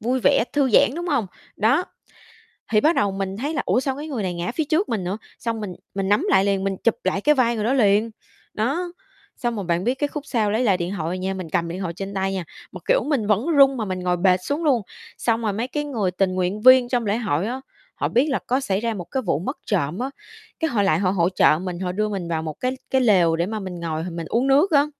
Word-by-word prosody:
vui 250 +3 0
vẻ, - - +4
thư 275 -3 +2
giãn, 220 - +5
đúng 345 +1 -4
hông? 260 -9 +1 0.3
Đó, 250 - +3 0.9
thì 215 - +4
bắt 320 +3 +3
đầu 200 -1 +2
mình 195 0 -4
thấy 290 +7 -3
là, 290 - 0
"Ủa, 205 +7 +2
sao 265 0 -2
cái 300 - -6
người 255 -9 -3
này 180 -2 -2
ngã 175 +4 -3
phía 315 - +1
trước 320 +7 0
mình 210 -5 -1
nữa?" 190 +4 -3 0.2
xong 230 -2 -3
mình 200 -3 -5 0.2
mình 195 -1 -1
nắm 205 +1 +3
lại 190 +1 +4
liền, 195 -1 +1
mình 195 -1 -1
chụp 230 - +3
lại 185 +1 0
cái 300 +5 +4
vai 235 -2 +2
người 215 - -2
đó 250 - +2
liền. 215 -2 +3 0.4
Đó, 300 +11 -1 0.4
xong 240 -1 -2
rồi 200 - -4
bạn 170 +1 0
biết 245 +4 +1
cái 290 +2 -1
khúc 295 0 -6
sau 220 -6 0
lấy 225 +4 +1
lại 195 -5 +3
điện 175 +2 -3
thoại 170 +3 -3
nha, 190 +1 -2
mình 185 -4 -6
cầm 170 +1 0
điện 175 +2 -5
thoại 170 -2 -3
trên 195 +3 -6
tay 195 0 -1
nha, 190 -2 -2 0.3
mà, - - -8
kiểu, - - +3
mình 270 -9 0
vẫn 215 - +1
run 275 -5 +5
mà 220 - -2
mình 185 -1 -3
ngồi 180 -1 0
bệt 180 0 +4
xuống 290 - -2
luôn. 260 -7 +3 0.4
Xong 230 -1 0
rồi 215 -3 -1
mấy 230 +5 -2
cái 295 +3 -3
người 225 -11 -1
tình 185 +1 0
nguyện 185 +3 -1
viên 255 0 +7
trong 240 -3 0
lễ 205 +2 +1
hội 200 -6 -1
á, 255 +3 -4 0.3
họ - - -1
biết 260 +6 +2
là 270 - 0
có 255 +2 +2
xảy 200 -8 -1
ra 230 +1 -1
một 180 -5 -6
cái 265 -2 -1
vụ 170 - 0
mất 265 - -4
trộm 175 -3 -1
á, 260 +2 -2 0.5
cái 320 - 0
họ 225 -6 +1
lại 195 - +2
họ 185 -2 +1
hỗ 175 -2 +2
trợ 180 -4 +4
mình, 180 -2 -5
họ 180 -1 -2
đưa 215 +3 -1
mình 190 -4 -4
vào 160 -1 -2
một 155 -2 -5
cái 255 +1 -1
cái 265 - +2
lều 185 -8 +4
để 170 +1 0
mà 215 +2 -4
mình 185 -3 -6
ngồi 160 -1 -3
mình 165 0 -5
uống 245 +4 +1
nước 285 +8 +4
á. 285 -2 +5
210 Hz, 275 wpm, -23 LUFS, 185-260 Hz, 0.9 s, viên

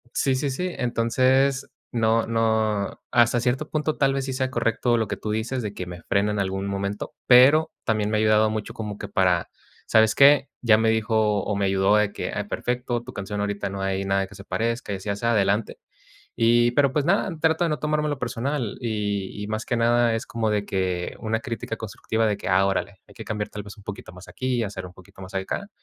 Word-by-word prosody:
Sí, 135 -1 +2
sí, 140 +2 -1
sí. 180 +7 -3
Entonces 130 +3 +2 0.2
no 115 -1 +2
no 110 -3 0
hasta 120 0 +4
cierto 130 +5 -1
punto 155 0 -1
tal 135 -1 +3
vez 135 0 -1
sí 135 - -3
sea 130 0 -1
correcto 120 0 +1
lo 110 -2 0
que - - -3
tú 105 - -4
dices 115 +4 -2
de 105 -3 -4
que 90 - -5
me 90 -1 -9
frene 100 +1 +1
en 105 - -2
algún 95 0 -2
momento, 100 +1 -3
pero 135 +6 +6
también 105 -1 +1
me 110 - +1
ha - - +1
ayudado 110 0 +4
mucho 110 -1 -4
como 105 -2 -5
que - - -6
para 90 -3 +1 0.4
¿sabes 110 0 +4
qué?, 140 0 +6
ya 110 -3 +5
me 110 0 +2
dijo 110 -2 +1
o 105 - -2
me 100 0 0
ayudó 95 +1 +3
de 105 -1 +2
que: - - -4
"Ay, 105 - -2
perfecto, 120 +2 -2
tu 125 +1 -10
canción 100 +1 -5
ahorita 100 0 -2
no 100 0 -5
hay 95 0 -1
nada 95 0 0
que 105 - -15
se 100 - -11
parezca, 115 0 -2
y - - -2
así 95 +2 -7
y - - +2
asá, 115 +4 0
adelante". 105 0 +1 0.6
Y 120 +1 +4
pero, 140 +1 +3
pues, 150 - +1
nada, 195 +4 +2
trato 160 +1 +2
de - - +1
no 150 - -1
tomármelo 150 0 -1
personal, 125 -1 -3
y 105 -4 -3
y - - -5
más 110 +1 -3
que 120 - -1
nada 120 0 +3
es 115 - -5
como 115 -2 -1
de 105 -1 0
que 90 -2 -2
una 110 0 -1
crítica 115 -1 -5
constructiva 110 0 -2
de 105 -2 +1
que: - - -6
"Ah, 95 +1 +4
órale, 100 0 -2
hay - - -18
que - - -9
cambiar 105 -1 -3
tal 105 - -6
vez 100 +2 -11
un 105 - -17
poquito 105 -1 -8
más 90 +1 -13
aquí 130 -1 -2
y 120 - 0
hacer 95 -3 -6
un 90 - -12
poquito 95 +1 -17
más 95 +1 -10
acá". 95 - -3
110 Hz, 230 wpm, -24 LUFS, 100-125 Hz, 0.6 s, pero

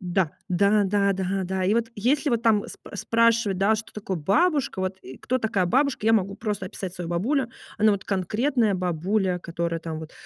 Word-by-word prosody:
Да, 180 -3 0 0.2
да, 200 +3 +3
да, 200 0 +2
да, 190 +1 -1
да, 185 0 -2
и 195 - +2
вот 230 0 +1
если 270 +8 +1
вот 235 -3 +1
там 220 -3 +3
сп - - -12
спрашивать, 230 -1 +2 0.2
что 220 - -9
такое 195 -3 -4
бабушка, 285 - +1
вот, 190 0 -2
э, 130 +1 -10
кто 255 - -1
такая 220 -5 0
бабушка, 265 +5 +1
я 225 - +5
могу 200 -2 +1
просто 210 -4 -3
описать 185 -1 -6
свою 175 -2 -5
бабулю, 230 - 0 0.3
она 215 0 +5
вот 200 -2 -3
конкретная 215 - +1
бабуля, 180 +2 0
которая 170 -1 -3
там 160 -1 -5
вот 160 0 -9
200 Hz, 195 wpm, -25 LUFS, 180-225 Hz, 0.3 s, я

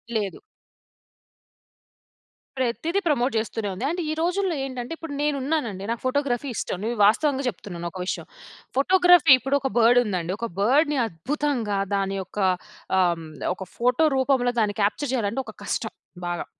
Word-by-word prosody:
లేదు. 205 -3 -2 2.2
ప్రతిది 260 - 0
ప్రమోట్ 270 -4 +2
చేస్తూనే 220 -1 -2
ఉంది. 190 - -6
అంటే 350 +3 -2
ఈ - - 0
రోజుల్లో 360 0 0
ఏంటంటే 255 +2 -5
ఇప్పుడు 325 -3 -7
నేను 295 -1 +1
ఉన్నానండి, 250 -10 -2
నాకు 235 - -3
ఫోటోగ్రఫీ 270 0 0
ఇష్టం. 180 - -3
నేనిది 230 0 -2
వాస్తవంగా 275 +5 +2
చెప్తున్నాను 175 -4 -7
ఒక 185 - -8
విషయం. - - -3 0.5
ఫోటోగ్రఫీ 355 +1 +5
ఇప్పుడు 270 +2 0
ఒక 270 - -2
బర్డుందండి. 225 -7 +3
ఒక 235 - -2
బర్డ్‌ని 290 +6 +3
అద్భుతంగా 230 - -2 0.2
దాని 195 0 -1
యొక్క 190 - -12 0.6
ఆహ్, 175 -2 +3
హ్మ్, 160 -1 -9 0.3
ఒక 190 - -7
ఫోటో 250 +6 +3
రూపంలో 260 -2 +2
దాన్ని 210 -2 +1
క్యాప్చర్ 245 +7 0
చేయాలంటే 230 +1 0
ఒక - - -9
కష్టం - - -2 0.4
బాగా. 175 0 -3
245 Hz, 145 wpm, -24 LUFS, 205-290 Hz, 2.2 s, ఫోటోగ్రఫీ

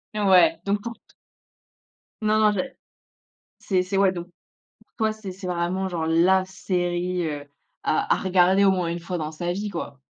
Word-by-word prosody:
Ouais 205 - +5
donc 200 +1 0
pour 235 - -5
t 230 - -28 1.1
Non, 215 0 +2
non 215 -1 +5
j'ai 265 +7 -3 0.9
c'est 185 -2 +1
c'est, 185 +2 -2
ouais 195 -1 +4
donc 175 -1 -6
pour 175 - -35 0.5
toi, 220 -1 +1
c'est 215 -3 -8
c'est 185 +1 -9
vraiment 180 +2 -1
genre 170 -3 -2
la 180 +4 +4
série, 180 -1 -2
heu, 145 -2 -5 0.4
à 155 - +1
à - - -3
regarder 190 +1 +3
au 195 - +6
moins 180 -3 0
une 170 +1 -3
fois 175 +1 -4
dans 155 -1 -4
sa 175 +3 -3
vie 205 +3 -3
quoi! 145 -7 -6
185 Hz, 185 wpm, -24 LUFS, 175-200 Hz, 1.1 s, au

